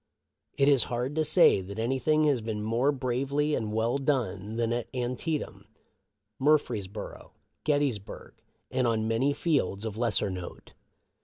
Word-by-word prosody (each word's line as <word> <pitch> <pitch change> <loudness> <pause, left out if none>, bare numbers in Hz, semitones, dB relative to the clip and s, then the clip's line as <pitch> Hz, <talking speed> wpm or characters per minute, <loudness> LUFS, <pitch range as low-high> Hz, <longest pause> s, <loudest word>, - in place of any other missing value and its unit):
It 140 - +4
is 140 -4 +5
hard 125 +3 -2
to 155 - +3
say 155 - +5
that 100 +2 -8
anything 135 +7 +1
has 140 -5 +2
been 110 -1 -4
more 115 +6 +2
bravely 140 +3 -1
and 110 -5 -1
well 115 +5 0
done 110 -7 -1
than 115 0 0
at 120 -1 -3
Antietam, 125 +5 -3 0.7
Murfreesboro, 110 -9 -1 0.3
Gettysburg, 145 -9 -1 0.4
and 130 -1 +1
on 110 -1 0
many 115 +5 +2
fields 135 - 0
of 110 0 -5
lesser 110 -4 +1
note. 90 -1 -8
120 Hz, 140 wpm, -28 LUFS, 110-140 Hz, 0.7 s, is